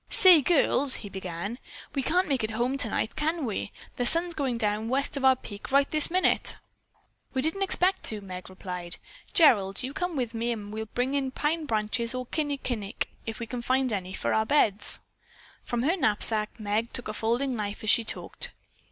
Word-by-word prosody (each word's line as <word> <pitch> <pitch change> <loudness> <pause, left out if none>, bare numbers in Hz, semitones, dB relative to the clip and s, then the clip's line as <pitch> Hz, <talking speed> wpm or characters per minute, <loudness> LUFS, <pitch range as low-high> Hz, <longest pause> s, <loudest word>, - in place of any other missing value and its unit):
"Say, 365 -5 +7
girls," 280 -3 +4
he - - -7
began, 190 +4 -5 0.3
"we 275 - 0
can't 360 +8 +1
make 270 -6 0
it 215 - -1
home 240 +4 -1
tonight, 225 -4 -1
can 315 0 -1
we? 210 -2 -3 0.3
The 245 - 0
sun's 340 +4 +2
going 270 -6 -2
down 215 0 -1
west 275 +3 0
of 275 - -3
our 265 0 +6
peak 205 -3 -10
right 280 +1 +4
this 305 -1 +7
minute." 370 +2 +2 0.8
"We 260 - 0
didn't 320 +6 -1
expect 380 -1 +2
to," 215 - 0
Meg 185 -2 -8
replied. 180 -2 -6 0.4
"Gerald, 205 - +4
you 260 +2 -4
come 355 0 -3
with 245 -4 -2
me 230 +1 -1
and 210 -2 -8
we 220 - -4
will 220 - -7
bring 250 +2 0
in 275 -2 0
pine 300 +4 -2
branches 230 +1 0
or 255 0 -3
kinnikinick, 255 -8 -3 0.2
if 225 +1 -4
we 235 - -4
can 245 +1 -5
find 255 0 +1
any, 185 -2 -3
for - - -1
our 220 - +3
beds." 220 -5 +2 0.6
From 240 0 -2
her 325 +7 +2
knapsack 215 - +1
Meg 215 +3 -1
took 245 - -2
a 215 - -4
folding 240 +5 -1
knife 210 -1 -4
as 215 - +4
she 235 - +5
talked. - - -3
245 Hz, 195 wpm, -27 LUFS, 215-280 Hz, 0.8 s, Say